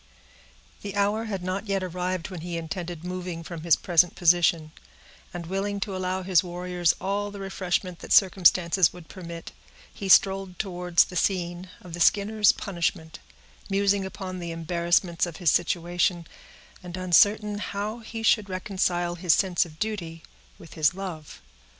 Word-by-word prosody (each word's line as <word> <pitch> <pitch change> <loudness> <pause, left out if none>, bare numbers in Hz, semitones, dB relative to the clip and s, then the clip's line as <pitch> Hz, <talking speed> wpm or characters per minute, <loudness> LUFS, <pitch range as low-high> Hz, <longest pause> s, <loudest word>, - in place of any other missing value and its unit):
The 200 -1 -6
hour 205 +3 +1
had 195 -5 -4
not 185 +3 -3
yet 195 -1 0
arrived 180 0 -3
when 180 -3 -7
he 170 0 -4
intended 170 0 -5
moving 180 -2 -5
from 165 -1 -7
his 170 0 +4
present 175 -1 +2
position; 170 -2 +3 0.6
and, 175 -1 -6
willing 195 +3 -2
to 200 -2 -3
allow 185 0 -2
his 180 -2 +3
warriors 180 -1 0
all 200 +2 -2
the 200 0 -9
refreshment 185 -2 -2
that - - -10
circumstances 180 -3 +4
would 175 -3 -14
permit, 170 -3 -9 0.4
he 195 - -6
strolled 190 -1 +4
towards 180 -3 +2
the 180 - -11
scene 180 0 -1
of 175 -2 -12
the 175 - -6
Skinners' 210 +4 +4
punishment, 170 -4 -3 0.5
musing 200 0 +2
upon 190 -1 -6
the 170 -1 -5
embarrassments 170 +1 0
of 165 - -8
his 175 -4 +2
situation, 175 0 0 0.6
and 180 0 -8
uncertain 205 +3 +3
how 205 +3 -4
he 225 0 -7
should 215 -2 +3
reconcile 185 -2 -1
his 175 -1 +2
sense 185 -3 +2
of 155 -1 -16
duty 170 -6 -4 0.3
with 165 - -14
his 155 +1 +2
love. 165 - -8
180 Hz, 155 wpm, -26 LUFS, 170-195 Hz, 0.6 s, his